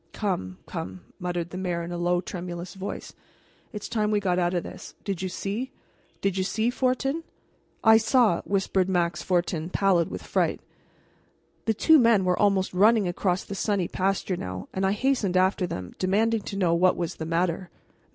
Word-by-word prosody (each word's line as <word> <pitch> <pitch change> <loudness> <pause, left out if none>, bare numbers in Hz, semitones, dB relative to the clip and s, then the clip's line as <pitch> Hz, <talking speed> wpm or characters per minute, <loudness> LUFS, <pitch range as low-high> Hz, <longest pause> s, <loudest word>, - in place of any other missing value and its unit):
"Come, 95 - -2
come," 95 0 -6 0.2
muttered 175 -2 -3
the 185 - -5
mayor 175 -2 -2
in 170 - -6
a 175 - -3
low, 175 0 +1
tremulous 175 -1 -6
voice, 195 +1 -6 0.6
"it's 210 -3 -6
time 215 -2 0
we 210 -1 +2
got 185 -3 +1
out 175 0 +1
of 175 - 0
this. - - -10
Did 195 -4 -3
you 190 - -2
see? 205 +8 -3 0.5
Did 195 -1 0
you - - +2
see, 220 +5 0
Fortin?" 270 +5 0 0.6
"I 220 0 +8
saw," 225 -4 +3
whispered 190 -1 0
Max 175 -2 +1
Fortin, 175 -2 0
pallid 185 -3 +2
with - - -6
fright. - - 0 1.1
The 220 - +1
two 320 +7 +6
men 230 -6 +4
were 180 -1 +1
almost 195 -2 +2
running 210 +2 +4
across 180 +1 0
the - - -7
sunny 195 -1 0
pasture 190 -1 -1
now, 90 - -5
and 190 0 +1
I 195 - +2
hastened 210 -5 +1
after 185 0 +2
them, 90 - -6
demanding 215 +4 +2
to 195 - -6
know 180 -4 +2
what 180 +2 +3
was 170 -2 -3
the 160 - -4
matter. 170 +1 0
185 Hz, 180 wpm, -26 LUFS, 175-210 Hz, 1.1 s, I